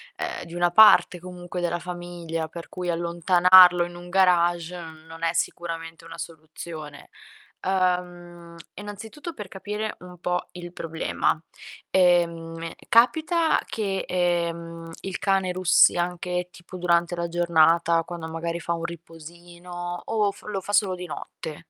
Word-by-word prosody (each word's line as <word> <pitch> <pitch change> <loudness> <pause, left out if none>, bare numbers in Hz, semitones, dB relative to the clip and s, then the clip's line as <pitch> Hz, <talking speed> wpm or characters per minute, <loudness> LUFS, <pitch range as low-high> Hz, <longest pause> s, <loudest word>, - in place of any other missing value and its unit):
ehm, - - -4
di 170 - -10
una 175 0 +2
parte 210 -3 +7
comunque 180 0 -7
della 175 0 -1
famiglia, 175 -2 -5
per 165 +1 -9
cui 180 -1 -5
allontanarlo 175 +1 +6
in 175 0 -10
un 175 0 -10
garage 175 -2 +2
n 160 -1 -11
non 165 +1 -11
è 165 - +1
sicuramente 165 -1 -4
una 165 0 -10
soluzione. 155 -2 -9 0.5
Ehm, 175 -2 -2 0.2
innanzitutto, 220 - -8
per 205 -8 -8
capire 210 +3 -5
un 180 0 -12
po' 180 0 -2
il 175 -1 -8
problema: 165 -2 -1 0.5
ehm, 170 -2 +1 0.2
capita 315 +8 +3
che, 195 -3 -3
ehm, 170 -2 -1
il 195 -2 -5
cane 195 -2 +1
russi 180 -1 +4
anche 180 0 -2
tipo 175 +1 -11
durante 175 0 +1
la 170 0 -1
giornata, 170 0 +3
quando 165 -1 -7
magari 170 +1 -4
fa 170 - -4
un 165 0 -4
riposino 175 +1 -8
o 210 -2 +1
f 200 - -17
lo 205 -2 -4
fa 205 - -6
solo 200 -3 +2
di 180 - -7
notte? 155 0 -7
175 Hz, 140 wpm, -25 LUFS, 170-180 Hz, 0.5 s, parte